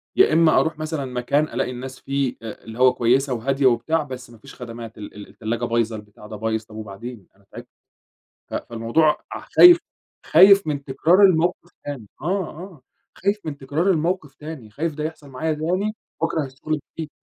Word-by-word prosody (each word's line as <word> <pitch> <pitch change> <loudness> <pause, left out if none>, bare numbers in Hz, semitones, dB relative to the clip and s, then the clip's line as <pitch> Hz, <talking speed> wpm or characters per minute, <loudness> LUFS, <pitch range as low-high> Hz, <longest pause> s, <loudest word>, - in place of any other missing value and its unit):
يا 385 - +5
إمّا 165 -1 +5
أرُوح 160 -1 -1
مثلًا 155 -3 -3
مكان 125 +4 0
ألاقي 125 -4 -2
الناس 130 +1 -8
فيه 135 -2 -1
أ 110 -2 -8
اللي 115 +2 -10
هو 130 0 +6
كويسة 130 +3 +2
وهادية 135 +4 0
وبتاع 130 +6 +2
بس 130 -3 -9
ما 115 - -15
فيش 135 +5 -14
خدمات، 115 -2 -9
ال 105 - -9
ال 105 - -10
التلاجة 115 +2 -3
بايظة، 115 -1 0
البتاع 105 0 -12
ده 110 - -8
بايظ، 110 +1 -2
طَب 110 - -15
وبعدين! 110 0 -8
أنا 100 0 -28
تعبت، - - -10 0.8
ف - - -6
فالموضوع 120 +7 +1 0.2
اح - - -10
خايف 350 -1 +10 0.5
خايف 195 +2 +7
من 140 -2 -2
تكرار 165 +8 +3
المَوقِف 175 -2 +3
تاني، 135 -7 -6 0.2
آه، 185 +3 -1
آه 170 -4 -11 0.3
خايف 200 +2 0
من 150 -3 -4
تكرار 150 +8 0
المَوقِف 165 -3 -1
تاني، 150 -8 -9
خايف 155 +7 -3
ده 150 0 -4
يحصَل 155 -2 -6
معايا 155 +4 -2
تاني 185 +7 -1 0.3
وأكرَه 160 -3 0
الشغل 140 +4 -4 0.2
الجديد. 160 -2 -5
140 Hz, 185 wpm, -22 LUFS, 115-160 Hz, 0.8 s, خايف